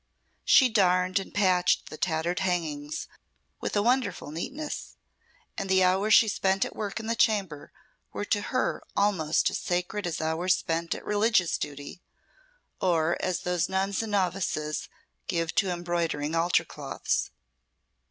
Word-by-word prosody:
She 260 - +6
darned 185 -3 +2
and 195 - -8
patched 185 -3 +2
the - - -6
tattered 165 +2 -1
hangings 155 -5 -2 0.5
with - - -3
a 205 - +2
wonderful 240 - 0
neatness, 285 - -5 0.6
and 195 - -4
the 190 0 +4
hours 195 +4 +4
she 225 - +6
spent 195 -1 +1
at - - -8
work 210 0 -4
in 220 - -7
the 230 +1 0
chamber 195 -10 0 0.4
were - - -4
to - - +1
her - - -1 0.2
almost 185 -6 +2
as - - -2
sacred 180 +3 -2
as 165 - -3
hours 160 +4 +1
spent 165 +1 -2
at - - -10
religious 210 -4 +2
duty, 145 +5 -6 0.8
or 170 -2 +2
as 185 -2 -1
those 180 -1 0
nuns 190 +1 0
and 220 -2 -5
novices 180 -5 -1 0.4
give 165 -2 -1
to 195 - +2
embroidering 170 -4 -2
altar 165 +1 +2
cloths. - - -2
180 Hz, 145 wpm, -27 LUFS, 165-200 Hz, 0.8 s, She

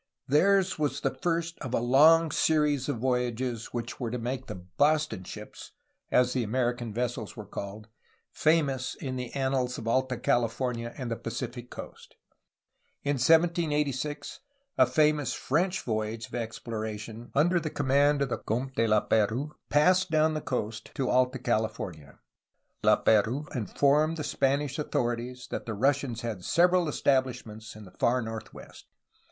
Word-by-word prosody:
Theirs 190 +5 +3
was 150 -2 -1
the - - 0
first 170 -1 -2
of 130 -3 -3
a - - +2
long 155 +7 +5
series 150 -3 +2
of 140 - -1
voyages 125 -1 -1
which 120 0 -5
were 120 -3 -2
to 125 - -3
make 125 +2 -4
the 90 - -7 0.2
'^Boston 150 -9 +2
ships,'' - - -10 0.4
as 125 0 +3
the 130 - 0
American 120 0 -1
vessels 120 -1 -3
were 110 - -7
called, 100 +2 -7 0.5
ifamous 145 -5 +1
in 130 -2 -5
the 125 -1 -5
annals 130 -2 0
of 115 - -7
Alta 130 +1 +1
California 120 0 0
and 125 -4 -4
the - - 0
Pacific 120 +2 -6
coast. - - -10 0.9
In 145 0 0
1786 150 -2 +1 0.4
a 130 - +5
famous 150 -1 +2
French 180 +6 0
voyage 110 0 -2
of - - -18
explora 110 -2 -4
tion, 110 +2 -9
under 175 +5 +4
the 160 -1 -3
command 145 +1 +2
of 135 - -3
the - - -2
Comte 130 +5 -3
de 115 -2 +1
Laperouse, 110 +5 +1 0.2
passed 180 +6 +4
down 155 0 +3
the 155 - -2
coast 110 -5 -4
to 135 -3 0
Alta 130 +1 +2
California. 110 - -3 0.7
Laperouse 120 +9 +2
informed 145 - +2
the 150 - -3
Spanish 140 +1 0
authorities 125 -2 -2
that - - -4
the 110 - -3
Russians 130 0 0
had 110 -7 -4
several 175 - +3
estabhsh 130 -4 +1
ments 110 0 -10
in 110 -1 -11
the 90 - -14
far 125 +5 +1
northwest. 110 0 -9
130 Hz, 150 wpm, -28 LUFS, 115-150 Hz, 0.9 s, long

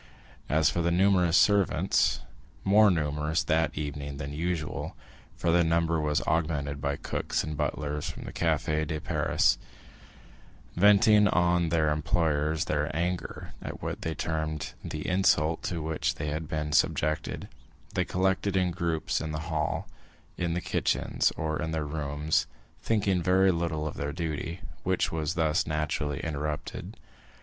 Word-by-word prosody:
As 80 +1 +3
for 85 - -1
the 85 - +2
numerous 90 -1 +4
servants 100 -3 +3 0.4
(more 105 +2 +6
numerous 75 -1 0
that 80 0 +1
evening 70 -1 -4
than 70 +1 -5
usual, 80 -1 -3 0.4
for 85 - 0
their 85 +1 +4
number 85 0 +1
was 75 -1 0
augmented 75 -3 -1
by 70 -1 0
cooks - - -2
and 75 0 -4
butlers 75 0 -2
from - - -7
the - - -8
Café 75 0 0
de 75 0 -2
Paris), - - +2 1.2
venting 105 +2 +6
on 85 -2 +2
their 80 -2 +2
employers 75 +1 +1
their 75 0 0
anger 90 +2 -3
at - - -7
what - - -4
they 80 -1 -3
termed 80 -1 -3
the 75 -1 -5
insult 85 -4 +2
to 85 -3 -3
which 80 0 -1
they 75 - -3
had 75 +2 -3
been 75 0 -2
subjected, 75 0 +1 0.5
they - - +1
collected 95 +1 0
in 90 -1 +2
groups 85 -2 -1
in 80 -1 -3
the 75 +2 -5
hall, 75 0 -1 0.5
in 85 -1 -1
the 90 - -1
kitchens, - - +1
or 80 -1 -2
in 80 - -2
their 80 -2 -1
rooms, 75 0 -1 0.3
thinking 100 -5 +1
very 95 +2 +4
little 85 -3 -1
of 75 - -5
their 70 +1 -2
duty, 85 +2 -4 0.2
which 95 0 0
was 80 -1 -2
thus 80 -1 +1
naturally 75 -2 -1
interrupted. 75 -2 -4
80 Hz, 150 wpm, -28 LUFS, 75-85 Hz, 1.2 s, more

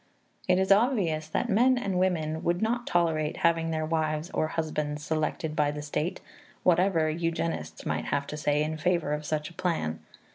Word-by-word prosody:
It 180 0 +4
is 190 +1 +1
obvious 195 - +3
that 160 - -1
men 245 +4 +4
and 195 -6 -1
women 160 -4 0
would 175 +1 +1
not 240 +3 -1
tolerate 160 -3 +1
having 165 -1 +3
their 155 -1 -1
wives 155 +1 -1
or 155 - 0
husbands 150 -2 -2
selected 155 0 -2
by 150 -1 +2
the 150 0 -4
state, 150 +3 -2 0.4
whatever 175 -2 +3
eugenists 155 - -2
might - - -1
have 140 0 -1
to 150 - -6
say 150 0 +1
in 155 +1 -3
favor 170 -2 +1
of 150 0 -3
such 155 +1 -2
a - - -15
plan. 160 - -1
160 Hz, 180 wpm, -28 LUFS, 150-180 Hz, 0.4 s, It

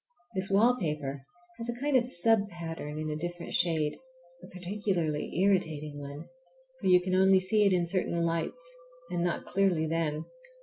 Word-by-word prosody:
This 190 0 +1
wallpaper 155 - +1 0.3
has 230 +1 -4
a 240 0 -4
kind 285 +1 +1
of 250 -1 +4
sub 210 0 +3
pattern 165 -4 -6
in 155 0 -3
a - - -2
different 175 +2 -5
shade, 160 -4 +1 0.4
a - - -9
particularly 180 -5 -2
irritating 155 -7 0
one, 145 +2 -7 0.5
for - - -2
you 180 -1 +7
can 185 +1 -3
only 190 0 +6
see 205 +3 +3
it - - +3
in 180 -2 +2
certain 170 -1 0
lights, - - -2 0.4
and 170 - 0
not 175 -1 -1
clearly 185 -4 +2
then. 160 -1 -1
175 Hz, 165 wpm, -30 LUFS, 155-195 Hz, 0.5 s, you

